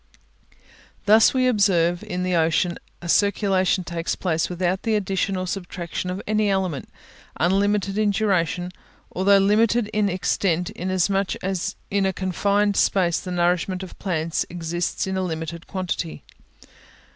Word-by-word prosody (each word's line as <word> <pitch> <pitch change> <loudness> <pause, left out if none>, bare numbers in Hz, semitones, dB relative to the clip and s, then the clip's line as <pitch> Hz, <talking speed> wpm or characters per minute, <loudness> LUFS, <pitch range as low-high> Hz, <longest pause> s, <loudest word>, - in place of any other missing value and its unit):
Thus 215 +2 +6
we 255 -1 +1
observe 180 -7 +2
in 180 0 -3
the 185 0 -1
ocean 165 +2 +1 0.2
a - - -5
circulation 195 0 +2
takes 170 -1 -3
place 165 -3 -1
without 180 +1 -1
the 225 -2 0
addition 195 -1 -1
or 185 - -2
subtraction 180 -1 -4
of 185 +2 -4
any 215 -1 +1
element, 185 -7 -1 0.5
unlimited 195 +3 +1
in 215 -1 +3
duration, 180 -4 0 0.4
although 195 +2 +5
limited 210 +3 +3
in 210 -1 +2
extent, 180 -1 0
inasmuch 185 +2 0
as 190 +1 -2 0.2
in 200 -1 +2
a 190 - -1
confined 200 +2 +1
space 175 -4 +2
the 185 - -8
nourishment 180 +1 0
of 185 - -11
plants 165 -4 -1
exists 175 0 -2
in 190 0 -2
a - - 0
limited 165 -1 -5
quantity. 180 -3 -4
185 Hz, 140 wpm, -23 LUFS, 175-200 Hz, 0.5 s, Thus